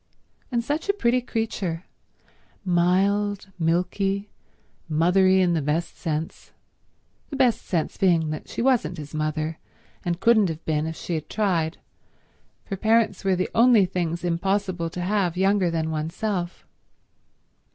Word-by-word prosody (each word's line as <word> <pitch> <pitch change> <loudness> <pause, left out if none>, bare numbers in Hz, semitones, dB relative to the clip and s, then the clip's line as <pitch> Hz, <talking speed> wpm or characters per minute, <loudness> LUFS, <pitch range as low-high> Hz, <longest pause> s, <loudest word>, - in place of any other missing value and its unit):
And 235 -1 0
such 300 +9 -2
a - - +5
pretty 250 -10 +1
creature—mild, 215 -8 -3 1.8
milky, 195 +4 0 0.6
mothery 185 +4 +4
in 180 -2 +3
the 165 - +1
best 150 +4 -1
sense; 160 0 -4 0.8
the 285 - -5
best 255 -4 +3
sense 165 -4 -2
being 170 -5 +2
that 155 - -6
she - - -3
wasn't 235 -11 +2
his 150 -1 -8
mother 155 +1 -2 0.4
and 170 -1 -2
couldn't 220 -4 +4
have 160 0 -6
been 155 0 0
if 160 - -4
she 175 - -5
had 155 -2 -4
tried, 175 -7 0 0.9
for 195 - -4
parents 220 -1 +2
were 190 -1 +2
the 185 - -2
only 230 -4 +6
things 175 -2 -2
impossible 180 0 -1
to 180 - -6
have 180 -2 0
younger 195 -1 +3
than 160 -1 -1
oneself. 175 +4 -3
180 Hz, 135 wpm, -24 LUFS, 165-205 Hz, 1.8 s, only